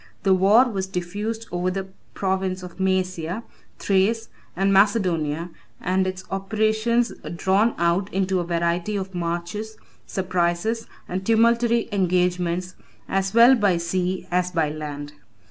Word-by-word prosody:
The 195 - +4
war 205 +7 +5
was 195 -5 -3
diffused 205 +5 -4
over 180 +1 0
the 190 +1 -3 0.3
province 190 -1 -1
of 180 -1 -10
Mæsia, 185 +1 -1 0.3
Thrace, 205 +4 +1 0.3
and 195 +1 +2
Macedonia, 180 -6 +2 0.3
and 185 +1 0
its 185 0 -4
operations 220 +4 +1 0.2
drawn 195 +6 +2
out 170 +3 +1
into 190 0 0
a - - 0
variety 170 +3 -1
of 190 -1 -4
marches, 175 +5 -4 0.3
surprises, 185 +4 -1 0.2
and 185 +1 -3
tumultuary 230 +2 +3
engagements, 180 -1 0 0.3
as 195 +1 -1
well 235 +3 +8
by 205 -8 +3
sea 180 +2 -2
as 180 0 +1
by 165 -4 0
land. 145 -1 -6
190 Hz, 130 wpm, -23 LUFS, 175-210 Hz, 0.3 s, well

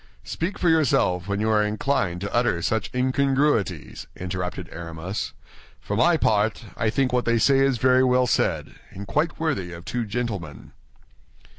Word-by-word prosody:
"Speak 175 +5 -3
for 180 - 0
yourself 120 - +2
when 100 0 -1
you 110 +1 +1
are 105 -1 +4
inclined 105 -4 -1
to 100 - -4
utter 115 -8 +1
such 110 +2 0
incongruities," 130 - 0
interrupted 90 -1 -4
Aramis. 85 +3 -5 0.5
"For 100 - -4
my 145 +9 +4
part, 110 -2 +1
I 110 - 0
think 130 +2 0
what 125 -1 +1
they 115 0 +2
say 135 +4 +4
is 135 -2 +3
very 130 +2 +4
well 125 0 +3
said, 120 - 0 0.2
and 100 +1 -8
quite 155 +10 -1
worthy 100 - -1
of 85 0 -10
two 120 -2 -3
gentlemen." 100 - -4
110 Hz, 160 wpm, -24 LUFS, 95-130 Hz, 0.5 s, are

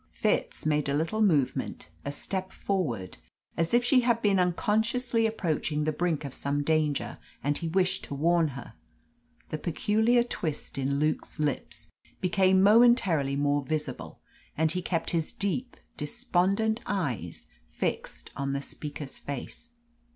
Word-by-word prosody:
Fitz - - 0
made 150 -2 +1
a 140 - +1
little 165 +9 0
movement, 150 - +1 0.2
a 140 - -3
step 190 +5 -4
forward, 145 - -2 0.4
as 165 0 0
if 240 +1 +4
she 255 +1 +5
had 235 -1 +2
been 200 -4 +3
unconsciously 225 +6 +1
approaching 155 -7 -1
the 155 - +1
brink 160 -2 -1
of 140 - -6
some 145 +1 -1
danger, 155 -1 0 0.2
and 145 +1 +1
he 170 - -3
wished 185 +2 +1
to 140 - -6
warn 165 +3 +3
her. 120 - -9 0.8
The 155 - -3
peculiar 220 +8 +2
twist 155 - -4
in 140 +1 0
Luke's 155 +2 -1
lips 150 -3 -3 0.3
became 190 +1 +3
momentarily 200 - +5
more 145 0 +2
visible, 155 +2 -4 0.4
and 160 0 +3
he 180 - -1
kept 170 -2 -1
his 165 -3 0
deep, 225 +6 -2 0.2
despondent 220 - +1
eyes 125 - -3 0.2
fixed - - -4
on 140 0 -2
the 140 - -1
speaker's 145 -1 -7
face. 145 - -7
165 Hz, 145 wpm, -28 LUFS, 145-205 Hz, 0.8 s, she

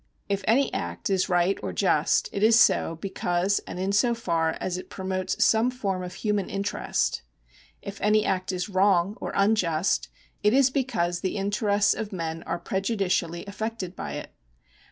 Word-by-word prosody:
If 200 -1 -1
any 265 +5 +3
act - - -3
is 190 0 +1
right 180 +2 +2
or - - -3
just, - - +2
it 200 - -3
is 225 +2 +6
so 240 -8 +3
because 190 +1 0
and - - -6
in 190 +2 -1
so 235 +4 +3
far 165 -7 0
as 180 - -2
it 185 - -7
promotes 185 -1 -1
some 225 +2 +3
form 200 -7 -3
of 180 0 -7
human 210 -3 -1
interest. 195 - -1 0.6
If 200 0 -8
any 210 +1 +3
act 185 0 -1
is 180 +1 -3
wrong 195 -1 +2
or - - -3
unjust, 195 -5 +1 0.3
it 210 +4 +3
is 270 -1 +4
because 220 -11 -1
the 190 - -2
interests 205 +1 +2
of 220 -1 -5
men 165 -3 -4
are 170 - -1
prejudicially 190 -4 -1
affected 200 -2 -5
by - - -5
it. - - -7
195 Hz, 170 wpm, -26 LUFS, 180-210 Hz, 0.6 s, is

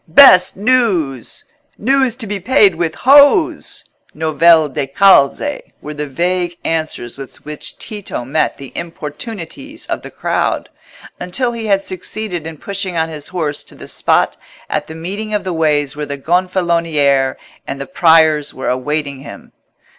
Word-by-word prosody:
"Best 180 - +7
news!" 195 - 0 0.3
"News 265 +1 +1
to 245 -3 -7
be 205 -1 -4
paid 205 -1 +4
with 165 -1 -2
hose!" 285 - +4 0.3
(novelle 160 +1 +4
da 140 0 -3
calze) 195 - +3 0.2
were 150 - -7
the 150 0 -4
vague 175 +4 -1
answers 155 -7 -3
with 135 -1 -11
which 150 0 -7
Tito 205 - -5
met 150 +5 0
the 135 -2 -10
importunities 200 - -7
of - - -3
the - - -9
crowd, - - -2 0.5
until 240 +8 -1
he 230 -2 -5
had 195 -1 +2
succeeded 185 -3 -5
in 160 -1 -8
pushing 195 0 -3
on 160 0 0
his 150 -2 -7
horse 155 -5 -3
to - - -14
the - - -11
spot - - +1 0.3
at - - -1
the 160 - -9
meeting 200 +6 -4
of 205 - -1
the 185 - -3
ways 150 -3 +1
where 150 0 -5
the 140 - -4
Gonfaloniere 165 -5 +1 0.3
and 140 - -5
the 140 - -4
Priors 160 -2 +3
were 130 - -3
awaiting 140 +2 -2
him. 140 - -11
165 Hz, 155 wpm, -16 LUFS, 150-200 Hz, 0.5 s, Best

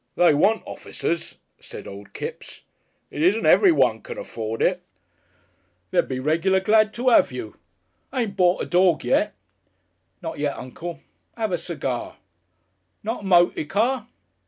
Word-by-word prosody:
They 175 -3 +5
want 205 +10 +2
officers," 170 0 -4 0.2
said - - -10
old 100 +1 -10
Kipps. - - -7 0.5
"It 150 - -5
isn't 200 +7 +3
everyone 360 -5 +5
can 480 -1 -8
afford 115 - -4
it. 180 0 +1 1.1
They'd - - +2
be 130 -1 -3
regular 165 +7 +2
glad 215 +2 +3
to 250 +1 +2
'ave 130 - +4
you.... 110 -4 -7 0.5
Ain't 235 -7 -2
bort 180 -1 +3
a - - -3
dog 175 -3 +3
yet?" - - +1 0.8
"Not - - -6
yet, 145 -1 -1
uncle. 165 +7 -7 0.4
'Ave 220 -4 -1
a - - +2
segar?" 140 -7 -4 0.9
"Not 225 +2 -3
a - - -9
moty 175 -4 +4
car?" 230 - 0
180 Hz, 140 wpm, -23 LUFS, 150-220 Hz, 1.1 s, They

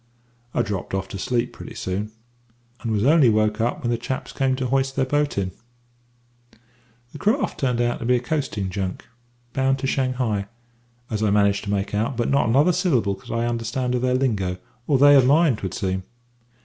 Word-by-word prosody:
"I - - +2
dropped 100 -2 -4
off 95 0 -2
to 100 - -6
sleep 120 +3 -1
pretty - - -10
soon, 100 +3 -3 0.7
and 115 - -3
was 105 -1 +1
only 145 -1 +5
woke 110 0 +1
up 120 +2 -1
when 120 - 0
the 120 - 0
chaps 130 +2 -4
came 135 -1 +1
to 130 0 -3
hoist 135 +1 0
their 135 - +1
boat 145 0 0
in. 95 -2 -1 1.6
"The 150 - -9
craft 230 - 0
turned 125 -3 0
out 120 0 0
to - - -5
be 125 +1 +3
a - - +2
coasting 120 -7 -2
junk, 95 -1 -4 0.5
bound 135 0 +2
to 135 - -4
Shanghai, 125 -7 0 0.6
as 110 -1 -1
I 110 - +2
managed 100 0 +2
to - - -5
make 100 0 -1
out, 115 +4 -1
but 120 - 0
not 140 -4 +2
another 145 +9 +4
syllable 150 - +1
could - - -12
I 115 0 0
understand 120 +2 -2
of 125 - 0
their 125 0 +1
lingo 105 -9 0 0.3
or 140 - +3
they 145 +2 +7
of 130 -2 +6
mine 150 -1 +4
'twould 95 - -5
seem. 95 -1 -1
120 Hz, 200 wpm, -23 LUFS, 105-135 Hz, 1.6 s, they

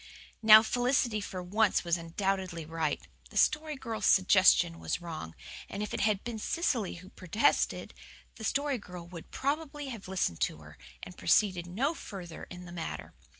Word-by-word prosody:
Now, 220 0 +9
Felicity 245 -2 +1
for 185 -2 -5
once 205 +3 +2
was 170 -1 +1
undoubtedly 175 0 -2
right. 155 - -2 0.2
The - - -7
Story 305 0 +2
Girl's 225 -6 -3
suggestion 185 -3 +5
WAS - - -2
wrong; 160 - -7 0.3
and 205 - -4
if 210 - -5
it - - -2
had 210 -2 +1
been 235 -2 -5
Cecily 240 - -1
who 185 +2 -12
protested, 190 - 0 0.4
the 220 - -9
Story 280 +2 0
Girl 180 -4 -9
would 170 -1 -10
probably 290 0 -3
have 230 -7 -8
listened 185 - -1
to - - 0
her, - - -14 0.2
and 180 - -8
proceeded 185 -5 +2
no 250 - 0
further 180 - -8
in 180 0 -10
the 175 - -10
matter. 170 -2 -6
195 Hz, 165 wpm, -30 LUFS, 175-230 Hz, 0.4 s, Now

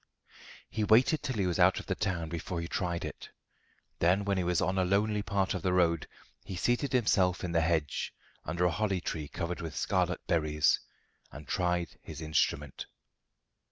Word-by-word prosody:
He 110 - -2
waited 125 +8 +4
till 130 - -3
he 100 -3 +1
was 90 -2 -1
out - - +5
of - - -9
the - - -1
town 85 -4 -2
before 85 +1 -4
he 85 - -4
tried 85 -1 -2
it. - - -8 0.7
Then, 95 +4 +3
when 100 -1 +1
he - - +1
was 90 -1 +1
on 95 +1 +1
a - - +3
lonely 105 +3 +1
part 100 -2 0
of 95 - -3
the 90 +1 +1
road, 85 -3 +2 0.4
he 95 - -6
seated 120 +8 0
himself 100 -8 +2
in 90 - -2
the 85 -1 +3
hedge, 80 -3 0 0.3
under 90 +1 0
a 90 - +3
holly 100 +1 0
tree 80 -3 -4
covered 85 +4 -4
with 80 -4 -6
scarlet - - 0
berries, 75 -2 +2 0.5
and 75 +2 -10
tried 90 -3 -1
his 75 -2 -9
instrument. 75 -3 -1
90 Hz, 185 wpm, -31 LUFS, 85-100 Hz, 0.7 s, out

